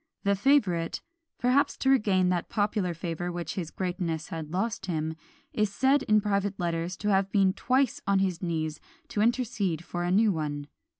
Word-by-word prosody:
The 200 -1 +3
favourite, 195 -9 +2 0.4
perhaps 255 +3 +2
to 265 - +1
regain 195 -8 +3
that 175 -2 -1
popular 205 -4 0
favour 175 +1 -3
which 170 -2 -4
his 175 -5 -4
greatness 175 -4 -3
had 160 -2 -5
lost 195 +3 -2
him, 160 -2 -2 0.4
is 210 -2 +1
said 265 +6 +3
in 215 -5 +3
private 200 -1 -1
letters 170 +1 -2
to 210 - -2
have 195 -1 +2
been 195 -2 +3
twice 255 +3 +1
on 200 0 +3
his 185 -3 0
knees 155 -3 -2 0.3
to 205 - -1
intercede 220 - 0
for 175 0 -3
a 175 - 0
new 210 +3 +4
one. 145 -3 -3
190 Hz, 175 wpm, -28 LUFS, 170-210 Hz, 0.4 s, new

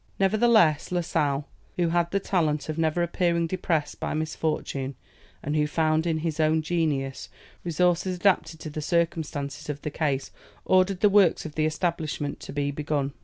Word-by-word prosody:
Nevertheless, 195 -6 +4
La 180 -1 +1
Sale, 145 -4 -1 0.3
who 175 -2 +1
had 170 0 +1
the 200 - 0
talent 160 -6 0
of 155 - -3
never 160 +2 +1
appearing 170 0 +1
depressed 165 -3 -1
by - - -2
misfortune, 155 -3 -2 0.5
and 150 0 -2
who 150 -1 +2
found 155 +1 +1
in 160 -1 +1
his 160 -1 -2
own 155 0 +3
genius 150 -5 -1 0.3
resources 180 +2 +1
adapted 180 -3 +1
to 155 - -6
the 155 - -4
circumstances 160 -4 -2
of 145 -1 -5
the 150 - -3
case, 140 -3 -1 0.3
ordered 185 0 +3
the 210 - +6
works 195 -5 +4
of 155 - -6
the 155 0 +1
establishment 155 -3 -2
to - - -8
be 145 0 -1
begun. 145 -1 -2
160 Hz, 170 wpm, -26 LUFS, 150-175 Hz, 0.5 s, the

